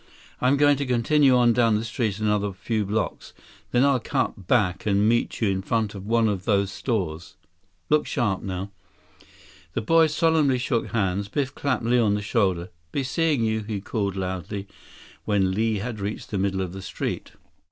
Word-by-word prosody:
I'm 130 Hz, +3 st, +3 dB
going 145 Hz, 0 st, +4 dB
to 140 Hz, -, -2 dB
continue 130 Hz, +3 st, +4 dB
on 120 Hz, -1 st, +4 dB
down 115 Hz, -2 st, +3 dB
the 110 Hz, +2 st, -1 dB
street 110 Hz, -3 st, -2 dB
another 105 Hz, -2 st, 0 dB
few 105 Hz, +2 st, -2 dB
blocks. 105 Hz, +1 st, -3 dB, 0.4 s
Then 125 Hz, +2 st, +3 dB
I'll 140 Hz, -2 st, +3 dB
cut 95 Hz, -4 st, -2 dB
back 95 Hz, -5 st, +1 dB
and 100 Hz, +1 st, +3 dB
meet 120 Hz, +1 st, 0 dB
you 110 Hz, -, +3 dB
in 95 Hz, -1 st, -1 dB
front 110 Hz, 0 st, -1 dB
of 100 Hz, 0 st, -8 dB
one 115 Hz, 0 st, +3 dB
of 100 Hz, -3 st, -2 dB
those 100 Hz, -2 st, +2 dB
stores. 90 Hz, -, -3 dB, 0.5 s
Look 150 Hz, 0 st, +2 dB
sharp, 105 Hz, -6 st, 0 dB
now." 95 Hz, +1 st, -5 dB, 1.0 s
The -, -, -1 dB
boys 160 Hz, +5 st, +3 dB
solemnly 160 Hz, -5 st, +3 dB
shook 125 Hz, -2 st, -1 dB
hands. 100 Hz, -2 st, -1 dB
Biff 135 Hz, +5 st, -2 dB
clapped 140 Hz, -4 st, -1 dB
Li 120 Hz, +1 st, +3 dB
on 105 Hz, -3 st, +3 dB
the 105 Hz, -, -3 dB
shoulder. 95 Hz, -5 st, 0 dB, 0.2 s
"Be 140 Hz, -, -1 dB
seeing 150 Hz, -1 st, +1 dB
you," 110 Hz, 0 st, +1 dB
he 105 Hz, -1 st, -4 dB
called 100 Hz, -1 st, -2 dB
loudly 95 Hz, +1 st, -4 dB, 0.6 s
when 100 Hz, -3 st, +2 dB
Li 110 Hz, +2 st, 0 dB
had 110 Hz, +2 st, -4 dB
reached 100 Hz, +2 st, -5 dB
the 100 Hz, -, -1 dB
middle 95 Hz, 0 st, 0 dB
of 90 Hz, -2 st, -4 dB
the 95 Hz, -, -7 dB
street. -, -, -5 dB
110 Hz, 185 wpm, -24 LUFS, 100-125 Hz, 1.0 s, going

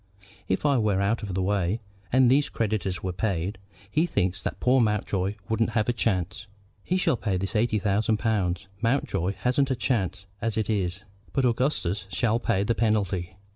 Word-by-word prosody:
If 95 Hz, -, 0 dB
I 140 Hz, -3 st, +4 dB
were 105 Hz, -3 st, +2 dB
out 100 Hz, +4 st, +1 dB
of 100 Hz, -4 st, -4 dB
the 95 Hz, -, 0 dB
way, 100 Hz, +1 st, +1 dB, 0.3 s
and 130 Hz, 0 st, +5 dB
these 140 Hz, +2 st, +3 dB
creditors 105 Hz, -5 st, -1 dB
were 95 Hz, -1 st, -2 dB
paid, 95 Hz, 0 st, -2 dB, 0.3 s
he 160 Hz, +7 st, +2 dB
thinks 95 Hz, -, 0 dB
that -, -, -4 dB
poor 125 Hz, +1 st, +4 dB
Mountjoy 105 Hz, -3 st, 0 dB
wouldn't 110 Hz, 0 st, +1 dB
have 105 Hz, -, +2 dB
a 120 Hz, -, +2 dB
chance. 95 Hz, -3 st, -1 dB, 0.4 s
He 185 Hz, -, 0 dB
shall 185 Hz, -, +2 dB
pay 100 Hz, -5 st, -1 dB
this 95 Hz, +4 st, -3 dB
eighty 110 Hz, 0 st, +2 dB
thousand 105 Hz, +2 st, +1 dB
pounds. 100 Hz, -3 st, 0 dB
Mountjoy 100 Hz, -6 st, 0 dB
hasn't 130 Hz, +2 st, +2 dB
a 130 Hz, -, +1 dB
chance 105 Hz, -6 st, -1 dB, 0.2 s
as 115 Hz, -1 st, -1 dB
it 110 Hz, 0 st, 0 dB
is; 95 Hz, -2 st, -1 dB, 0.3 s
but 135 Hz, -, +2 dB
Augustus 115 Hz, -, 0 dB
shall 115 Hz, +3 st, +1 dB
pay 115 Hz, -5 st, +1 dB
the 115 Hz, -, +1 dB
penalty." 100 Hz, -6 st, 0 dB
105 Hz, 180 wpm, -26 LUFS, 95-115 Hz, 0.4 s, and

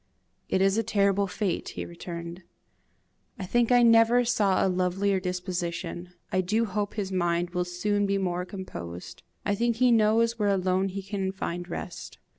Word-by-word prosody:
"It 190 Hz, -, +2 dB
is 195 Hz, +3 st, +3 dB
a -, -, +3 dB
terrible 200 Hz, -2 st, +2 dB
fate," 190 Hz, -1 st, -2 dB
he -, -, -3 dB
returned. 170 Hz, 0 st, -7 dB, 1.0 s
"I 190 Hz, -, -5 dB
think 240 Hz, +5 st, +1 dB
I 245 Hz, -1 st, +6 dB
never 230 Hz, +1 st, +5 dB
saw 205 Hz, -5 st, +2 dB
a -, -, +3 dB
lovelier 185 Hz, +2 st, +1 dB
disposition. 180 Hz, -1 st, -4 dB, 0.2 s
I 185 Hz, -, +2 dB
do 215 Hz, +5 st, +1 dB
hope 205 Hz, 0 st, -3 dB
his 200 Hz, -3 st, -3 dB
mind 175 Hz, -1 st, 0 dB
will 180 Hz, 0 st, -1 dB
soon 205 Hz, +3 st, 0 dB
be 200 Hz, 0 st, +1 dB
more 180 Hz, -2 st, -1 dB
composed. 90 Hz, -, -8 dB, 0.2 s
I 205 Hz, -, +1 dB
think 235 Hz, +3 st, +1 dB
he 250 Hz, +1 st, +4 dB
knows 230 Hz, +1 st, +3 dB
where 205 Hz, -1 st, +2 dB
alone 190 Hz, 0 st, +1 dB
he 195 Hz, +1 st, -5 dB
can 195 Hz, -1 st, -2 dB
find 175 Hz, -2 st, -5 dB
rest. 170 Hz, 0 st, -7 dB
190 Hz, 170 wpm, -27 LUFS, 180-210 Hz, 1.0 s, I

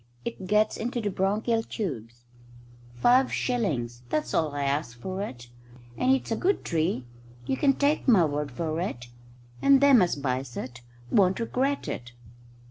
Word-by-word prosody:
"It 195 Hz, -5 st, -5 dB
gets 210 Hz, +2 st, +2 dB
into 240 Hz, +2 st, -2 dB
the 210 Hz, -3 st, -2 dB
bronchial 210 Hz, +5 st, 0 dB
tubes. 120 Hz, -, -6 dB, 0.7 s
Five 250 Hz, -, +4 dB
shillings 135 Hz, -, -1 dB
that's 155 Hz, -, -1 dB
all 160 Hz, -2 st, +2 dB
I'll 140 Hz, -1 st, -1 dB
ask 140 Hz, -4 st, -2 dB
you -, -, -20 dB
for 190 Hz, +1 st, -3 dB
it. 120 Hz, -, -7 dB, 0.5 s
And 255 Hz, -, +2 dB
it's 265 Hz, -3 st, 0 dB
a -, -, +2 dB
good 380 Hz, -, 0 dB
tree. 160 Hz, -5 st, -1 dB, 0.4 s
You -, -, 0 dB
can 275 Hz, 0 st, +3 dB
take 290 Hz, +1 st, +1 dB
my 205 Hz, -9 st, +6 dB
word 145 Hz, -1 st, -2 dB
for 160 Hz, +4 st, -3 dB
it. 120 Hz, -10 st, -5 dB, 0.5 s
And 275 Hz, -1 st, +6 dB
them 280 Hz, -5 st, +6 dB
as 180 Hz, -, +2 dB
buys 130 Hz, -2 st, -3 dB
it 125 Hz, -1 st, -6 dB, 0.3 s
won't 190 Hz, 0 st, +3 dB
regret 265 Hz, +4 st, -1 dB
it." 120 Hz, 0 st, -6 dB
185 Hz, 165 wpm, -27 LUFS, -, 0.7 s, my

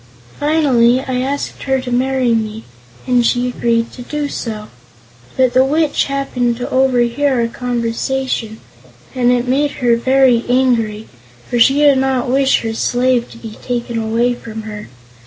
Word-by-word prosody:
Finally 265 Hz, -6 st, +3 dB
I 260 Hz, -2 st, -3 dB
asked 280 Hz, +2 st, -4 dB
her 265 Hz, -1 st, +1 dB
to 255 Hz, -1 st, -6 dB
marry 255 Hz, -1 st, +1 dB
me, 220 Hz, -1 st, -2 dB, 0.4 s
and 250 Hz, -1 st, +2 dB
she 245 Hz, +1 st, +1 dB
agreed 235 Hz, -2 st, -1 dB
to 250 Hz, -, -11 dB
do 290 Hz, +3 st, -4 dB
so, 215 Hz, -5 st, -6 dB, 0.7 s
but 255 Hz, -2 st, +2 dB
the 255 Hz, +1 st, +5 dB
Witch 300 Hz, +2 st, +1 dB
happened 255 Hz, -4 st, -1 dB
to 245 Hz, -, -4 dB
overhear 260 Hz, +1 st, +2 dB
our 230 Hz, -, +1 dB
conversation 240 Hz, -1 st, -3 dB, 0.5 s
and 250 Hz, -2 st, +1 dB
it 245 Hz, 0 st, 0 dB
made 285 Hz, +3 st, +1 dB
her 240 Hz, -1 st, +4 dB
very 255 Hz, 0 st, +3 dB
angry, 230 Hz, -4 st, +1 dB, 0.4 s
for 240 Hz, -, -1 dB
she 270 Hz, +4 st, +5 dB
did 285 Hz, -2 st, +4 dB
not 265 Hz, -2 st, 0 dB
wish 270 Hz, 0 st, +2 dB
her 225 Hz, -1 st, -3 dB
slave 245 Hz, +1 st, 0 dB
to -, -, -13 dB
be 225 Hz, -2 st, -10 dB
taken 240 Hz, -1 st, -3 dB
away 230 Hz, +2 st, 0 dB
from 225 Hz, -2 st, -8 dB
her. 210 Hz, -1 st, -8 dB
245 Hz, 155 wpm, -16 LUFS, 235-265 Hz, 0.7 s, the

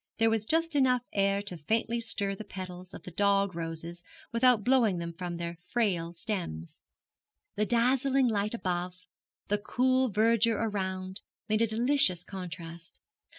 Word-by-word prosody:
There 225 Hz, 0 st, +3 dB
was 220 Hz, -1 st, -1 dB
just 330 Hz, 0 st, +2 dB
enough 255 Hz, -3 st, +3 dB
air 200 Hz, 0 st, +1 dB
to 205 Hz, -3 st, -5 dB
faintly 225 Hz, +8 st, -1 dB
stir 200 Hz, -3 st, 0 dB
the 195 Hz, -, -7 dB
petals 185 Hz, -2 st, -8 dB
of -, -, -10 dB
the 180 Hz, -, -9 dB
dog 200 Hz, +1 st, +2 dB
roses 165 Hz, +1 st, -5 dB, 0.3 s
without 235 Hz, -2 st, +4 dB
blowing 235 Hz, -6 st, +3 dB
them 170 Hz, 0 st, -4 dB
from 175 Hz, 0 st, -5 dB
their 170 Hz, 0 st, -5 dB
frail 185 Hz, -8 st, 0 dB
stems. 170 Hz, -, -5 dB, 0.7 s
The 210 Hz, 0 st, +1 dB
dazzling 260 Hz, +2 st, +3 dB
light 210 Hz, 0 st, 0 dB
above, 180 Hz, -2 st, -3 dB, 0.4 s
the 205 Hz, 0 st, +1 dB
cool 255 Hz, +4 st, +2 dB
verdure 225 Hz, +1 st, +3 dB
around, 190 Hz, -3 st, -3 dB, 0.3 s
made 215 Hz, 0 st, +1 dB
a 230 Hz, -, +4 dB
delicious 225 Hz, -5 st, +3 dB
contrast. 170 Hz, -3 st, -8 dB
205 Hz, 150 wpm, -29 LUFS, 180-230 Hz, 0.7 s, without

